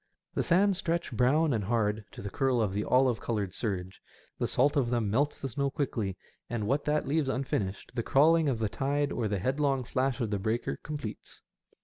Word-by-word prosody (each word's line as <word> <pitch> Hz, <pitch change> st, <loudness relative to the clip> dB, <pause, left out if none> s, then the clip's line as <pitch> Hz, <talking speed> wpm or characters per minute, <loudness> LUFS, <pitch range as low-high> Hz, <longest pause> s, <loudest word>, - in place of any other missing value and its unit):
The -, -, 0 dB
sands 190 Hz, +2 st, +3 dB
stretch 170 Hz, -1 st, -1 dB
brown 135 Hz, +6 st, +3 dB
and 110 Hz, -3 st, 0 dB
hard 105 Hz, -1 st, 0 dB
to -, -, -9 dB
the 100 Hz, -, -5 dB
curl 130 Hz, 0 st, +1 dB
of 105 Hz, -4 st, +1 dB
the 105 Hz, +1 st, -1 dB
olive 125 Hz, -1 st, +3 dB
coloured 105 Hz, -6 st, -2 dB
surge; 95 Hz, -4 st, -3 dB, 0.4 s
the -, -, +1 dB
salt 140 Hz, +3 st, +2 dB
of 130 Hz, -5 st, +2 dB
them 115 Hz, -4 st, 0 dB
melts 140 Hz, +6 st, +1 dB
the 135 Hz, -, -4 dB
snow 140 Hz, +3 st, -1 dB
quickly, 115 Hz, -9 st, -2 dB, 0.3 s
and 115 Hz, -3 st, -2 dB
what 140 Hz, +7 st, 0 dB
that 150 Hz, -1 st, +1 dB
leaves 145 Hz, -1 st, +1 dB
unfinished 110 Hz, -8 st, -2 dB
the 120 Hz, -, -1 dB
crawling 155 Hz, +5 st, +4 dB
of 125 Hz, -, 0 dB
the 110 Hz, -1 st, 0 dB
tide 140 Hz, +5 st, -1 dB
or 115 Hz, -3 st, -1 dB
the 100 Hz, -1 st, -1 dB
headlong 135 Hz, +5 st, 0 dB
flash 130 Hz, +1 st, -1 dB
of 115 Hz, -4 st, -1 dB
the 100 Hz, -, 0 dB
breaker 110 Hz, +5 st, -2 dB
completes. 145 Hz, -8 st, -7 dB
125 Hz, 205 wpm, -29 LUFS, 110-145 Hz, 0.4 s, crawling